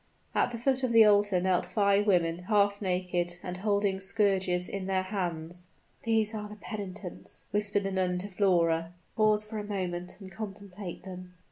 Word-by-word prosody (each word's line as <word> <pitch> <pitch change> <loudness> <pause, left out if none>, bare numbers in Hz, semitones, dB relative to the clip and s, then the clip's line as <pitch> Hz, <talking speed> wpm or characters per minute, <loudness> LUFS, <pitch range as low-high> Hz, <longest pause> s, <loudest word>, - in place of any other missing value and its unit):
At - - +2
the 240 - -5
foot 260 +2 +1
of 255 -3 0
the 225 -1 +8
altar 205 -2 +4
knelt 180 -1 +1
five 200 +2 +2
women, 175 -2 +2
half 205 0 +2
naked, 180 -2 -1
and 180 -1 -4
holding 200 -1 +1
scourges 190 -3 +1
in 195 -1 -4
their 190 -1 +1
hands. 175 -3 -4 0.3
"These 225 -3 +1
are 210 -1 -5
the 210 - -9
penitents," 200 -3 -7
whispered 205 0 +1
the 195 - -2
nun 185 -1 0
to 185 +3 -3
Flora. 175 -4 +1 0.2
"Pause 215 -1 +3
for 215 0 -5
a - - -4
moment 180 -3 -4
and 190 -2 -10
contemplate 195 -2 -7
them." 180 -1 -9
195 Hz, 170 wpm, -29 LUFS, 180-210 Hz, 0.3 s, the